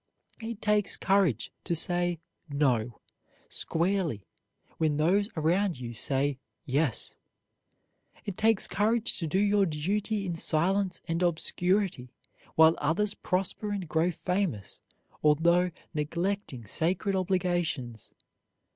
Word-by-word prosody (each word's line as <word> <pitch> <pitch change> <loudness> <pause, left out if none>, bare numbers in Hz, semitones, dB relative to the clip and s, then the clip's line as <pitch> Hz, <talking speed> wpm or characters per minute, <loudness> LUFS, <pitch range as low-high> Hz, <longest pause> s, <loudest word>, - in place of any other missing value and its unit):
It 225 -1 -6
takes 210 -2 +2
courage 190 - +1
to 170 - 0
say 175 +1 +2 0.3
"No" 125 -6 0 0.5
squarely 170 - -1 0.5
when 155 -2 +1
those 195 +7 +2
around 170 +1 +1
you 120 -1 -6
say 135 +3 0 0.3
"Yes." 140 -3 -1 1.1
It 200 - -4
takes 220 0 +2
courage 225 +3 +1
to 165 - -2
do 155 - 0
your 200 -1 +3
duty 200 +7 -1
in 175 -2 -2
silence 180 +4 +1
and 165 +1 -1
obscurity 180 -3 0 0.5
while 160 0 +7
others 195 +8 +1
prosper 195 +2 -2
and 200 -4 -3
grow 160 +3 +1
famous 180 - -2 0.4
although 170 +4 +4 0.2
neglecting 170 - -2
sacred 180 - 0
obligations. 175 - -1
175 Hz, 110 wpm, -29 LUFS, 150-195 Hz, 1.1 s, while